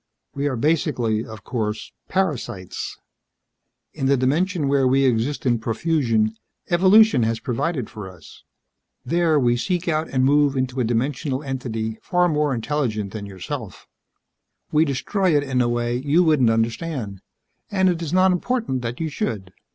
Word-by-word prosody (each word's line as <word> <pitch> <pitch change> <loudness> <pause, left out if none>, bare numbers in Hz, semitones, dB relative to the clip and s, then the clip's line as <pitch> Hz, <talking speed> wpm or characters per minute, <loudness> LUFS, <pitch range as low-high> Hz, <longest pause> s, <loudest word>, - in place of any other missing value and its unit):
We 140 0 -1
are, 135 - -1
basically 125 -5 0
of 110 -1 -10
course, 110 -3 -3 0.2
parasites. 145 - -3 1.0
In 135 - -2
the 140 0 +4
dimension 155 +5 +1
where 135 -1 +3
we 135 +1 +3
exist 125 +4 0
in 120 -2 +2
profusion, 115 -3 0 0.4
evolution 190 - +6
has 115 0 0
provided 130 +3 -2
for 105 -3 -8
us. 90 -4 -15 0.6
There, 165 +1 +2
we 120 -2 +3
seek 180 +8 -2
out 160 -1 0
and 130 -1 +1
move 145 0 +3
into 130 0 -1
a - - +2
dimensional 130 +4 -1
entity 115 -5 -4
far 180 0 +2
more 150 -3 +1
intelligent 115 -6 -2
than 105 -2 -6
yourself. 95 -2 -7 0.8
We 155 +1 +4
destroy 155 +5 +1
it 145 - +1
in 130 -3 0
a 120 - +1
way 120 0 -1
you 145 +7 +2
wouldn't 150 -8 +4
understand, 115 - -2 0.5
and 190 -2 +2
it 175 -2 +1
is 160 -3 -4
not 185 +1 +4
important 180 - -1
that 120 0 -4
you 165 - -1
should. 105 -10 -4
135 Hz, 155 wpm, -22 LUFS, 115-160 Hz, 1.0 s, evolution